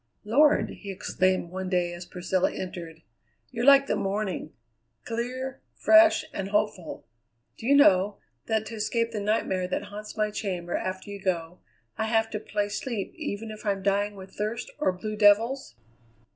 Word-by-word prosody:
"Lord!" 290 +8 +4
he 200 - -9
exclaimed 185 -2 0
one 190 0 -4
day 175 -2 +1
as 175 +1 -8
Priscilla 180 +1 0
entered; 170 -3 -7 0.5
"you're 240 +1 -1
like 275 0 +8
the - - 0
morning: 195 -4 -2 0.5
clear, 255 +3 -4
fresh, 325 -1 +6
and 195 0 -3
hopeful. 205 -5 -1 0.5
Do 225 - -7
you 280 - +6
know, 200 -7 +5 0.3
that 220 -1 0
to 220 - -8
escape 230 +1 -1
the 215 - -3
nightmare 200 -3 0
that 185 - -2
haunts 210 +1 -9
my 215 0 +1
chamber 180 -5 -3
after 185 +2 -4
you 200 -1 -7
go, 175 -2 -2 0.4
I - - +1
have 225 0 +1
to 210 - -2
play 205 -1 -2
sleep 205 0 -4
even 225 -9 -5
if 215 - -10
I'm 200 -2 -1
dying 205 +1 +1
with 190 -1 -11
thirst 215 +3 -3
or 300 - +2
blue 215 +4 -5
devils? 215 - +3
205 Hz, 165 wpm, -27 LUFS, 185-225 Hz, 0.5 s, like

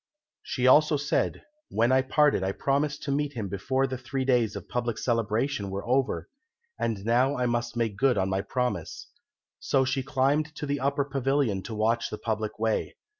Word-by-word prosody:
She 125 - -2
also 150 +3 +6
said, 145 +1 -1 0.3
"When 115 +3 +2
we 130 - +5
parted 145 -4 +2
I 95 +1 -1
promised 145 +4 -1
to 140 - -2
meet 145 +1 -1
him 110 -5 -4
before 130 +8 0
the 130 -2 -4
three 130 +1 -3
days 120 -5 +2
of - - -7
public 120 -2 -2
celebration 115 -1 0
were 100 +3 -5
over, 130 +1 +1 0.5
and 105 -4 -2
now 125 +5 +2
I 125 - 0
must 120 0 -1
make 110 -4 -1
good 130 +2 +3
my 95 +1 0
promise." 125 +3 -3 0.5
So 135 -1 +2
she 135 +1 0
climbed 145 +3 0
to 150 - -4
the 145 0 -1
upper 140 +1 0
pavilion 135 -6 0
to 110 - -5
watch 115 +2 +1
the 105 - -5
public 110 -2 -3
way. 110 0 -1
125 Hz, 180 wpm, -27 LUFS, 110-140 Hz, 0.5 s, also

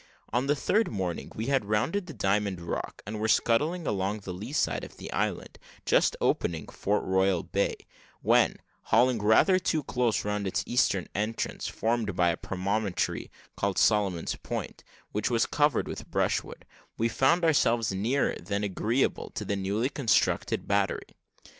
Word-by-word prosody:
On 125 +3 +1
the 145 - +3
third 215 +10 +1
morning, 95 -5 -3
we 110 - -3
had 135 -4 +1
rounded 135 - 0
the 160 - -7
Diamond 100 -2 0
Rock, 85 -1 -5
and 105 +1 -5
were 110 - 0
scudding 150 +10 +2
along 100 0 -1
the 95 -2 -6
lee 105 +8 -7
side 80 - 0
of - - -10
the - - -7
island, - - -2 0.3
just - - +3
opening 80 -2 0
Fort 105 +1 -1
Royal 95 -1 +2
bay, - - 0 0.5
when, - - +4 0.3
hauling 120 0 +3
rather 110 - +5
too 160 -4 0
close 120 -7 0
round 105 -1 -1
its 95 - -1
eastern 105 -7 +1
entrance, 105 +2 -2
formed 110 -3 -1
by 90 -1 +3
a 85 - 0
promontory 100 +1 -2 0.3
called 100 -1 -1
Solomon's 100 -6 +2
Point, - - -5 0.3
which 105 0 -1
was 115 -2 +2
covered 145 -4 +1
with - - -7
brushwood, - - -1 0.3
we 115 - +2
found 150 +9 +2
ourselves 120 -9 +3
nearer 115 +9 +1
than 100 +1 -2
agreeable 110 +6 0
to - - -3
a - - +1
newly 100 +6 -1
constructed 125 -9 +1
battery. - - 0
105 Hz, 160 wpm, -28 LUFS, 95-125 Hz, 0.5 s, rather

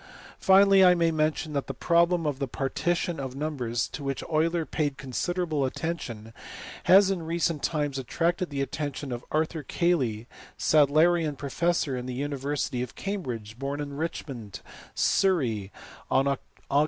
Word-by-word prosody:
Finally 195 0 +6
I 180 -1 +7
may 170 -1 +2
mention 155 0 0
that 140 -1 -2
the 135 - -5
problem 170 +3 +2
of 145 -3 -1
the 135 - -1
partition 165 +6 -1
of 135 -1 -5
numbers, 130 -6 -2
to 145 - -7
which 135 -1 -3
Euler 165 +1 +1
paid 145 -3 -2
considerable 155 +4 -1
attention, 130 -7 -4 0.5
has 190 +2 +7
in 185 -3 -2
recent 165 -1 -1
times 145 -4 -1
attracted 170 +7 -1
the 140 -2 -3
attention 145 -1 -4
of 120 0 -4
Arthur 160 +1 0
Cayley, 130 -9 0 0.3
Sadlerian 155 +1 +3
professor 150 0 0
in 125 0 -5
the 125 - -4
university 140 -2 -2
of 125 - -5
Cambridge, 125 - -5
born 140 +1 -3
in 145 -1 -5
Richmond, 135 - -5 0.3
Surrey, 120 - +1 0.4
on 135 - +3
Aug. 140 -1 0
150 Hz, 145 wpm, -27 LUFS, 135-170 Hz, 0.5 s, I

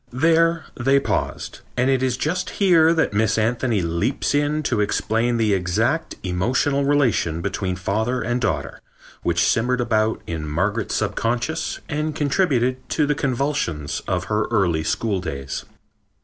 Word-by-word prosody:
There 165 +4 +3
they 135 +3 +3
paused, - - -3 0.2
and 125 - +2
it 135 -1 +2
is 130 -1 0
just 180 +7 -1
here 170 -5 +5
that 165 -9 +1
Miss 110 +1 +2
Anthony 115 -2 +1
leaps 85 +15 -1
in 145 +1 +1
to 120 -7 0
explain 115 +3 0
the 110 -3 +2
exact 90 -2 0
emotional 125 +10 +1
relation 130 - +2
between 95 0 -2
father 110 +7 -1
and 120 +1 -1
daughter 110 - -2 0.4
which 85 -1 +1
simmered 125 +6 +1
about 110 -2 0
in 80 -2 -4
Margaret's 100 +8 -1
subconsciousness 125 +8 -1
and 150 0 -2
contributed 135 -5 +1
to 155 - +1
the 150 - +1
convulsions 130 - -2
of 90 -1 0
her 105 +3 0
early 90 -8 +1
schooldays. 80 -9 -3
120 Hz, 140 wpm, -22 LUFS, 95-140 Hz, 0.4 s, here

